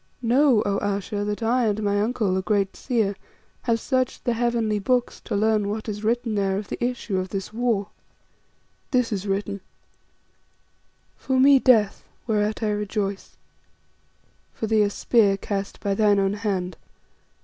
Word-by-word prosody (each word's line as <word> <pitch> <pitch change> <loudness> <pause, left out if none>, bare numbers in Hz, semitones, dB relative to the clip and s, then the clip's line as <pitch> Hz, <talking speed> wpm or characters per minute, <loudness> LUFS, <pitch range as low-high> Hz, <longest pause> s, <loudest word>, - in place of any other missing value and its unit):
Know, 245 -1 +4
O 200 -1 0
Ayesha, 205 +1 -2
that 210 +2 -3
I 240 +1 +2
and 210 0 -1
my 205 0 +1
uncle, 215 -3 0
the 190 - 0
great 195 -1 0
seer, 220 -6 0 0.5
have 230 -2 0
searched 255 -1 -1
the 240 - +1
heavenly 230 -3 0
books 245 +4 0
to - - -2
learn 210 0 +2
what 215 +2 -4
is 210 0 -5
written 235 +1 0
there 195 -2 0
of 205 -2 -6
the - - -4
issue 240 -6 -1
of 185 0 -4
this 195 +2 -5
war. 225 -4 0 1.0
"This 250 -3 +1
is 200 0 -3
written: 200 0 -2 1.6
For 260 -1 0
me, 275 +1 +7
death, 220 -6 +3 0.2
whereat 215 0 0
I 215 - +1
rejoice. 205 -1 -3 1.2
For - - -3
thee 220 0 +3
a 205 - +3
spear 205 -1 +2
cast 200 -1 -4
by 200 - -1
thine 205 0 +3
own 195 0 +1
hand. 190 -5 -2
210 Hz, 160 wpm, -24 LUFS, 200-235 Hz, 1.6 s, me